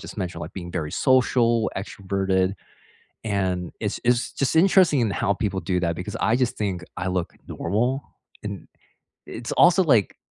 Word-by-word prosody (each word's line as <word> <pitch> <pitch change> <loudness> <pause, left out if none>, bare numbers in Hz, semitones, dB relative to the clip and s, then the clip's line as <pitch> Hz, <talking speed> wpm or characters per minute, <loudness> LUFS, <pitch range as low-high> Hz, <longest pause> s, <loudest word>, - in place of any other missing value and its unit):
just - - -9
mentioned, 90 -3 -4
like, - - -7
being 85 -2 -7
very 75 -2 -3
social, 120 -3 +3
extroverted, 95 -1 -1 0.7
and, 95 -4 -1
it's - - -2
it's 120 0 +2
just 140 - -1
interesting 170 -4 +5
in 110 -3 +1
how 100 - 0
people 100 -2 -2
do 90 +2 0
that, 85 -1 0
because 100 +3 -5
I 110 - +3
just 125 -2 0
think 95 -4 -2
I 90 - -2
look 90 -2 -2 0.2
normal, 125 +6 -1 0.4
and - - -6 0.6
it's 120 +1 -6
also, 180 +2 +5
like, 120 - +3
100 Hz, 165 wpm, -24 LUFS, 95-125 Hz, 0.7 s, interesting